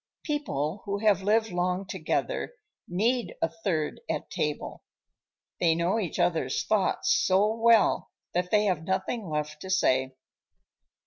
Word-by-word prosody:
People 200 - -2
who 200 0 -1
have 205 -2 +3
lived 220 +3 +2
long 180 +2 -1
together 190 - -2 0.3
need 230 +7 0
a - - +2
third 165 - -2
at - - -3
table: - - -3 0.8
they 165 -2 +3
know 170 +6 +1
each 180 -8 -3
other's 170 -7 +1
thoughts 210 -3 +2
so 200 +3 +3
well 230 -1 +4 0.2
that 180 +1 0
they 210 +1 +3
have 185 -6 +1
nothing 190 +3 -2
left 150 0 -3
to 190 - -7
say. 130 -8 +2
185 Hz, 135 wpm, -28 LUFS, 165-215 Hz, 0.8 s, well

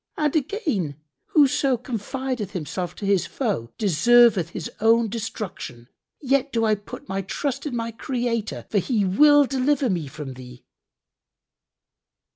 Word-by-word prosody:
And 300 -1 0
again, 275 - -1 0.3
'Whoso 275 -3 +3
confideth 250 -1 -4
himself 175 +1 -4
to 205 - -6
his 195 -3 +2
foe 200 - -2
deserveth 215 0 +4
his 170 -1 -6
own 225 +1 +4
destruction.' 195 - -6 0.3
Yet 275 0 +1
do 230 -2 +1
I 215 - +3
put 205 0 -7
my 195 +1 -2
trust 270 - -3
in 260 - -4
my 230 0 -2
Creator, 230 - -3
for 205 - +3
He 210 -1 0
will 290 +9 +6
deliver 270 -1 +1
me 170 -5 -2
from 140 -1 -7
thee." 125 -1 -12
225 Hz, 135 wpm, -24 LUFS, 180-260 Hz, 0.3 s, will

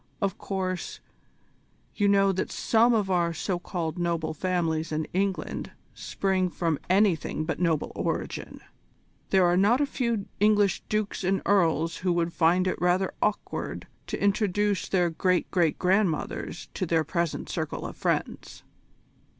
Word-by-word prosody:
Of 200 -2 -1
course, 185 -2 -3 0.9
you 205 - +1
know 195 -1 +4
that 190 - -2
some 230 +2 +3
of 210 -5 +1
our 170 -2 +1
so 180 +2 -2
called 175 -2 -4
noble 170 -2 -1
families 165 -2 -1
in 155 0 -1
England 195 +1 -2 0.2
spring 190 -2 -1
from 165 -3 -1
anything 185 -5 +2
but 160 - -3
a - - -5
noble 165 -4 +1
origin. - - -4 0.7
There 190 -2 +4
are 175 0 +3
not 205 +7 +4
a 290 - +3
few 235 -7 -1
English 205 -2 +3
dukes 215 -2 -1
and 190 +1 0
earls 165 -4 +2
who 180 -1 0
would 170 0 0
find 175 +2 +3
it 185 - -2
rather 180 +2 +2
awkward 210 - -2 0.2
to - - -4
introduce 205 0 +1
their 175 -3 +2
great 180 +2 0
great 170 -4 +2
grandmothers 185 -3 0
to 185 - -2
their 160 -1 +2
present 170 +1 -2
circle - - -4
of - - -6
friends." - - -3
185 Hz, 150 wpm, -27 LUFS, 170-200 Hz, 0.9 s, know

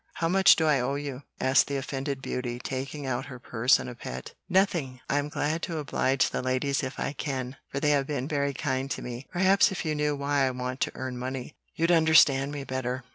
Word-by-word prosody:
How 165 - 0
much 190 +2 +6
do 160 - +1
I 150 -3 +4
owe 130 +3 -1
you?" 140 -2 -5 0.2
asked 130 +1 +4
the 140 - -3
offended 135 0 -4
beauty, 120 -1 -3
taking 135 +3 -5
out 130 0 -2
her 130 -2 -8
purse 125 +1 +3
in - - -6
a 125 - -6
pet. 65 - -7 0.2
"Nothing. 170 -9 +1
I'm 145 +1 0
glad 155 +3 -1
to 170 -3 -3
oblige 135 -2 +1
the - - -2
ladies 130 +2 0
if 130 -2 -5
I - - -2
can, 130 -3 -4
for 140 - -3
they 150 0 +2
have 140 -2 +2
been 140 -3 -2
very 140 -2 -1
kind 135 -1 -2
to - - -4
me. 125 +2 -7
Perhaps 190 +3 +4
if 190 - -4
you 155 - 0
knew 150 0 0
why 140 -1 +1
I - - +1
want 125 0 -4
to - - 0
earn 130 -1 -5
money, 130 +2 -5 0.2
you'd 165 +2 +2
understand 155 -4 +5
me 145 -1 -5
better. 130 -1 -3
135 Hz, 225 wpm, -27 LUFS, 130-150 Hz, 0.2 s, much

